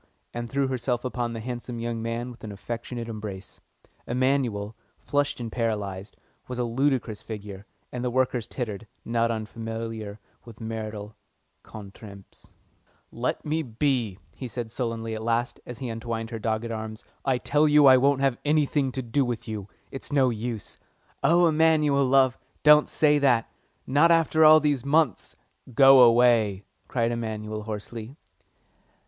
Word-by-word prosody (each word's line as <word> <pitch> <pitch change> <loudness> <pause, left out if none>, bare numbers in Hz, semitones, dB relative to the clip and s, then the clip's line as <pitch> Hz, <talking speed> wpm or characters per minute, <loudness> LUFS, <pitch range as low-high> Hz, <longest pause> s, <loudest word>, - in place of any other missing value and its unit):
and 120 0 -5
threw 140 +2 0
herself 125 -1 -2
upon 120 -2 -2
the 115 - -5
handsome 120 +1 -6
young 115 0 -3
man 115 +2 -3
with 120 -2 -15
an 110 - -6
affectionate 115 +3 -6
embrace. 105 -4 -8 0.5
Emanuel, 120 -5 0 0.2
flushed 145 -1 -1
and 115 -2 -5
paralysed, 105 -4 -3 0.3
was 125 - -5
a 125 - 0
ludicrous 120 -2 0
figure, 105 -2 -8 0.2
and 125 0 -4
the 125 - 0
workers 125 -2 0
tittered, 115 -3 -5 0.2
not 115 0 +1
unfamiliar 110 -1 -5 0.2
with 115 -3 -13
marital 110 -1 -6 0.5
contretemps. 100 -1 -12 0.6
"Let - - -3
me 155 +2 0
be," 120 -5 -1 0.2
he 130 - -7
said 115 0 -6
sullenly 115 -2 -3
at 110 - -4
last, 115 +3 -1
as 120 - -7
he 125 0 -5
untwined 115 0 -4
her 115 - -4
dogged 110 +1 -2
arms. 110 0 -6 0.2
"I 135 -2 +1
tell 150 +4 +2
you 150 -1 +6
I 130 -1 +8
won't 135 +1 +2
have 135 -3 +1
anything 145 -2 +1
to 130 - -3
do 120 +4 +1
with 120 -2 -4
you. 105 -2 -6 0.2
It's 135 - -8
no 135 -3 +3
use." 115 -1 -5 0.4
"Oh 170 +2 +4
no, 175 - +6
Emanuel, 155 -3 +3
love, 130 -1 +3 0.2
don't 150 0 +6
say 150 -1 +3
that; 125 -5 +2 0.3
not 145 +5 +4
after 165 -1 +4
all 155 0 +9
these 145 -4 0
months?" 155 +3 +1 0.4
"Go 135 0 +8
away!" 115 -4 +4 0.2
cried 115 -2 0
Emanuel 110 -2 -4
hoarsely. 110 +4 -7
120 Hz, 155 wpm, -26 LUFS, 110-135 Hz, 0.6 s, all